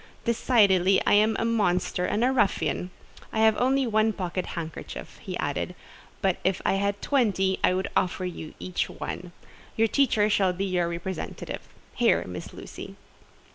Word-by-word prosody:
"Decidedly 200 -6 +4
I - - +4
am 215 +2 +4
a - - 0
monster 185 -5 +1
and 215 +5 0
a 255 - +4
ruffian. 200 -6 +1 0.4
I 220 - 0
have 220 -1 +5
only 265 +2 +2
one 220 -1 +2
pocket 185 -1 -3
handkerchief," 160 -1 -7
he - - -5
added, - - -2 0.5
"but 190 -2 +2
if 190 0 +1
I - - +3
had 200 +1 -1
twenty, 200 -8 +2
I 180 - +4
would 190 0 -1
offer 185 0 0
you 170 -3 -6
each 185 - -2
one. 180 -1 -6 0.4
Your 225 0 +3
teacher 225 -4 +3
shall 195 -3 +2
be 190 +2 -2
your 180 -3 0
representative. 170 +1 -5 0.3
Here, - - +3
Miss 90 -1 -7
Lucy." - - -9
195 Hz, 160 wpm, -26 LUFS, 180-220 Hz, 0.5 s, have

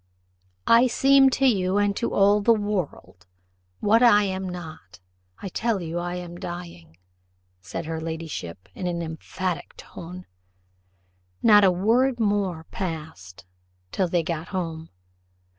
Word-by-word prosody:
"I 235 +2 +6
seem 270 +2 +5
to 270 +1 0
you 195 -6 +2
and 205 -1 +2
to 235 - -1
all 205 +1 +4
the 230 +3 +4
world, 190 - -4 0.5
what 220 +3 +4
I 210 -4 +6
am 190 -1 -3
not 160 - -9 0.4
I 195 - -4
tell 225 +2 -1
you 170 0 -4
I 175 0 -4
am 175 -1 -7
dying," 170 - -8 0.6
said 125 - -6
her 160 0 -4
ladyship 160 - -6
in 180 - -4
an 170 -1 -2
emphatic 165 +1 -5
tone. 180 +2 -10 1.2
Not 210 -2 +7
a 190 - +6
word 235 +8 +2
more 200 -6 0
passed 155 - -6 0.5
till 185 - 0
they 170 -1 0
got 165 0 -4
home. 165 -4 -4
180 Hz, 135 wpm, -24 LUFS, 165-205 Hz, 1.2 s, Not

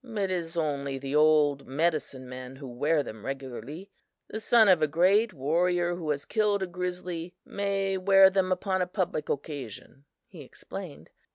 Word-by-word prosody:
"It 210 -6 -3
is 170 -2 -3
only 140 -4 -1
the 135 +1 -4
old 150 -2 +4
medicine 145 -3 -1
men 130 +1 -8
who 135 0 -9
wear 145 +5 +1
them 110 -5 -9
regularly. 135 - -7 0.4
The 220 - -4
son 225 0 +5
of 180 -4 +5
a 155 - +3
great 190 +8 +3
warrior 175 +4 +1
who 165 -3 -5
has 140 -1 -1
killed 210 -3 +1
a - - 0
grizzly 180 -1 -5
may 195 -1 -1
wear 195 0 +6
them 190 -1 +1
upon 185 +1 0
a 180 - 0
public 180 -5 -2
occasion," 140 -2 -6 0.2
he - - -13
explained. - - -10
170 Hz, 165 wpm, -28 LUFS, 140-190 Hz, 0.4 s, wear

